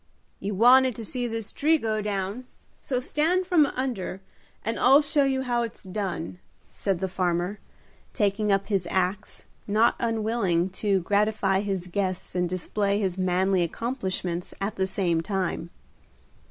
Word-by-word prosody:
"You 200 Hz, 0 st, -3 dB
wanted 250 Hz, +3 st, +6 dB
to 225 Hz, -, -6 dB
see 245 Hz, +2 st, -2 dB
this 225 Hz, -2 st, -5 dB
tree 315 Hz, +2 st, +3 dB
go 220 Hz, -5 st, -1 dB
down, 205 Hz, +3 st, -3 dB, 0.4 s
so 255 Hz, -3 st, -1 dB
stand 325 Hz, +8 st, +1 dB
from 340 Hz, -5 st, +4 dB
under 240 Hz, -8 st, -3 dB, 0.5 s
and 225 Hz, +1 st, -1 dB
I'll 280 Hz, +3 st, +6 dB
show 285 Hz, -1 st, +2 dB
you 265 Hz, -1 st, 0 dB
how 240 Hz, -2 st, 0 dB
it's 230 Hz, -2 st, -5 dB
done," 185 Hz, -3 st, -4 dB, 0.3 s
said 195 Hz, -3 st, -1 dB
the 190 Hz, -, 0 dB
farmer, 180 Hz, +1 st, -1 dB, 0.5 s
taking 205 Hz, 0 st, +1 dB
up 195 Hz, 0 st, +2 dB
his 195 Hz, -5 st, -1 dB
axe, 190 Hz, +3 st, -2 dB, 0.2 s
not 215 Hz, +3 st, +4 dB
unwilling 220 Hz, -6 st, 0 dB
to 200 Hz, -3 st, +2 dB
gratify 205 Hz, 0 st, +1 dB
his 195 Hz, -3 st, -2 dB
guests 185 Hz, 0 st, -3 dB
and 180 Hz, -1 st, 0 dB
display 200 Hz, +3 st, -1 dB
his 190 Hz, -3 st, -1 dB
manly 185 Hz, +1 st, +2 dB
accomplishments 185 Hz, -, -3 dB
at 195 Hz, +2 st, -2 dB
the 190 Hz, 0 st, 0 dB
same 175 Hz, -4 st, 0 dB
time. 185 Hz, -2 st, -2 dB
200 Hz, 150 wpm, -26 LUFS, 185-235 Hz, 0.5 s, wanted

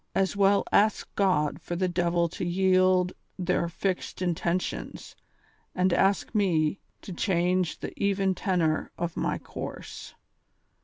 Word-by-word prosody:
As 195 Hz, +1 st, +1 dB
well 200 Hz, 0 st, +4 dB
ask 215 Hz, +1 st, +3 dB
God 180 Hz, -7 st, +1 dB
or 175 Hz, -, -1 dB
the 185 Hz, +1 st, 0 dB
devil 175 Hz, -1 st, +1 dB
to 175 Hz, -, -6 dB
yield 185 Hz, 0 st, +3 dB, 0.2 s
their 180 Hz, -2 st, 0 dB
fixed 185 Hz, +2 st, -3 dB
intentions, 175 Hz, 0 st, -2 dB, 0.6 s
as 185 Hz, -1 st, +2 dB
ask 195 Hz, +1 st, +2 dB
me 180 Hz, -5 st, +1 dB, 0.2 s
to 190 Hz, -, -7 dB
change 180 Hz, -1 st, 0 dB
tlie -, -, -5 dB
even 195 Hz, -1 st, +1 dB
tenor 175 Hz, -5 st, 0 dB
of 170 Hz, -1 st, -3 dB
my -, -, -1 dB
course. -, -, -8 dB
185 Hz, 125 wpm, -27 LUFS, 175-195 Hz, 0.6 s, well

